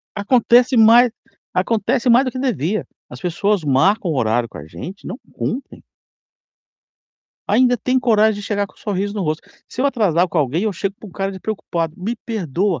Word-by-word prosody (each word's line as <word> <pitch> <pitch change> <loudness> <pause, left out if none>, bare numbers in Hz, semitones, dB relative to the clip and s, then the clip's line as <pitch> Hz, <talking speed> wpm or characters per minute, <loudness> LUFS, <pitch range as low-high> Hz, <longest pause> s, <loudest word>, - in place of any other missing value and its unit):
Acontece 240 +4 +3
mais 230 +2 +7 0.4
acontece 225 +6 0
mais 245 +3 +6
do 255 - -2
que 255 - -7
devia. 215 - -1 0.2
As - - -10
pessoas 190 +2 0
marcam 170 +8 +2
o 155 - -1
horário 115 0 +1
com - - -11
a 75 - -9
gente 185 - -9
e - - -12
não 205 - -6
cumprem. 265 +4 -5 1.6
Ainda 245 0 +3
tem 255 +4 +1
coragem 220 -4 +2
de 205 - -7
chegar 205 -1 -1
com - - -25
sorriso 200 0 -3
no 205 - -2
rosto. 155 -1 -2 0.3
Se - - -6
eu 275 - +3
atrasar 190 - +2
com 175 - -5
alguém, 150 +4 0
eu 215 - 0
chego 195 +2 -3
com - - -10
uma 190 - -13
cara 195 +1 -3
de 190 - -9
preocupado: 170 -6 -3
"Me 210 +6 -3
perdoa, 195 - -2
205 Hz, 190 wpm, -19 LUFS, 175-235 Hz, 1.6 s, mais